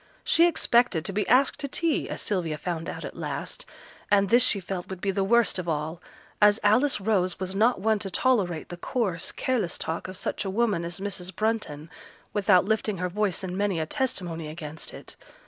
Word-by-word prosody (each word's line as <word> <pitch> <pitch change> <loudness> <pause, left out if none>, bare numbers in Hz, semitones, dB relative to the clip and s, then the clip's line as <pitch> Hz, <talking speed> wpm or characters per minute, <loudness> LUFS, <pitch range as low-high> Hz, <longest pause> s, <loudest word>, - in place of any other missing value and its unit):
She 335 +1 +5
expected 240 - +2
to 195 - -3
be 210 +1 -1
asked 255 +3 +3
to 280 - -2
tea, 325 +3 -1
as - - -4
Sylvia 170 -7 -1
found 165 0 -4
out - - -6
at - - -8
last, - - -5 0.4
and 200 -1 +4
this 240 +3 +6
she 200 - +4
felt 180 -1 -5
would 190 -1 -6
be 195 +1 0
the 195 0 0
worst 235 -1 +3
of 175 -2 -4
all, 160 +2 -3 0.4
as 210 +1 +6
Alice 235 +7 +3
Rose 190 -3 0
was 190 0 -3
not 225 +3 +3
one 215 +2 +2
to 195 - -3
tolerate 190 -7 +1
the 175 - -7
coarse, 185 -3 -2
careless 240 -10 -1
talk 165 +3 -4
of 185 0 -7
such - - -2
a 195 - -3
woman 205 -3 +1
as 170 +2 -4
Mrs. 190 -2 -4
Brunton 210 -9 -2 0.5
without 200 -3 +4
uplifting 215 -1 -1
her 180 +1 -2
voice 200 0 -1
in 180 -1 -4
many 200 -3 0
a 160 - -1
testimony 175 -7 -2
against 155 0 -6
it. - - -10
195 Hz, 200 wpm, -26 LUFS, 175-220 Hz, 0.5 s, this